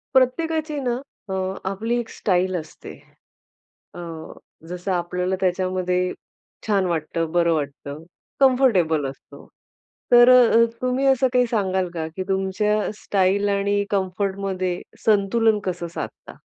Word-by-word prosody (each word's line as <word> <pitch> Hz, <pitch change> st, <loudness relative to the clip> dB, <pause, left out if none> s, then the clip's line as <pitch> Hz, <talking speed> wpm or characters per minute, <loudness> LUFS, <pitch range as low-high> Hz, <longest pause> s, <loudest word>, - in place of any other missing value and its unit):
प्रत्येकाची 310 Hz, +3 st, +1 dB
ना, 250 Hz, -3 st, -1 dB, 0.4 s
अ, -, -, -2 dB, 0.4 s
आपली 225 Hz, +5 st, -2 dB
एक 230 Hz, -, -5 dB
स्टाईल 185 Hz, -1 st, 0 dB
असते. 160 Hz, -3 st, -7 dB, 1.0 s
अ, -, -, -9 dB, 0.7 s
जसं 180 Hz, +2 st, -4 dB
आपल्याला 180 Hz, +1 st, -1 dB
त्याच्यामध्ये 180 Hz, 0 st, 0 dB, 0.5 s
छान 200 Hz, -3 st, +2 dB
वाटतं, 165 Hz, -1 st, -2 dB
बरं 170 Hz, -1 st, +3 dB
वाटतं 145 Hz, 0 st, -5 dB, 0.4 s
कम्फर्टेबल 225 Hz, -, +3 dB
असतो. 135 Hz, -, -14 dB, 0.6 s
तर 240 Hz, 0 st, +8 dB
अ, 245 Hz, -2 st, +6 dB, 0.2 s
तुम्ही 255 Hz, +2 st, 0 dB
असं 265 Hz, -1 st, +4 dB
काही 250 Hz, -1 st, +4 dB
सांगाल 190 Hz, -4 st, 0 dB
का 160 Hz, -2 st, -3 dB
की 190 Hz, -, -3 dB
तुमच्या 195 Hz, +2 st, 0 dB
स्टाईल 200 Hz, +1 st, +1 dB
आणि 200 Hz, 0 st, +1 dB
कम्फर्टमध्ये 190 Hz, -1 st, -2 dB, 0.2 s
संतुलन 215 Hz, +1 st, +3 dB
कसं 180 Hz, -2 st, -3 dB
साधता? -, -, -7 dB
190 Hz, 115 wpm, -22 LUFS, 180-230 Hz, 1.0 s, तर